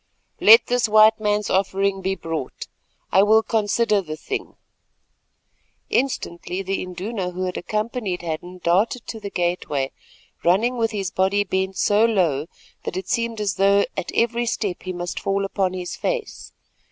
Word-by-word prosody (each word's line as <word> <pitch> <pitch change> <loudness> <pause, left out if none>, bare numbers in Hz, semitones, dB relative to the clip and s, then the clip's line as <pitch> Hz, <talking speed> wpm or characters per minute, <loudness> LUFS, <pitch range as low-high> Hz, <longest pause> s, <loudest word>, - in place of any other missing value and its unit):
"Let 225 +3 +8
this 245 -2 +1
white 215 +1 +6
man's 210 -1 0
offering 195 0 0
be 190 +1 -1
brought; 165 -7 -5 0.4
I 190 - +6
will 220 +2 +5
consider 215 -1 +1
the 155 -4 -7
thing." 405 - -5 1.4
Instantly 195 -7 -1
the 195 +1 -2
Induna 185 +2 -4
who 180 +1 -4
had 180 - -3
accompanied 215 -2 -3
Hadden 175 +2 -5
darted 205 +8 +1
to 225 - -6
the 205 -1 -6
gateway, 175 -7 -1 0.5
running 215 +9 +3
with 230 -2 +1
his 195 -4 -3
body 195 +3 +2
bent 190 -1 -2
so 205 +4 +3
low 170 -10 +2 0.4
that - - -4
it 190 - -5
seemed 230 -2 -1
as 205 -3 -1
though 200 +1 +4
at - - -4
every 235 +1 +1
step 200 -6 -2
he 185 - -5
must 175 -1 -4
fall 195 0 -1
upon 195 -2 -1
his 180 -1 -5
face. 485 -4 -4
195 Hz, 155 wpm, -22 LUFS, 180-220 Hz, 1.4 s, Let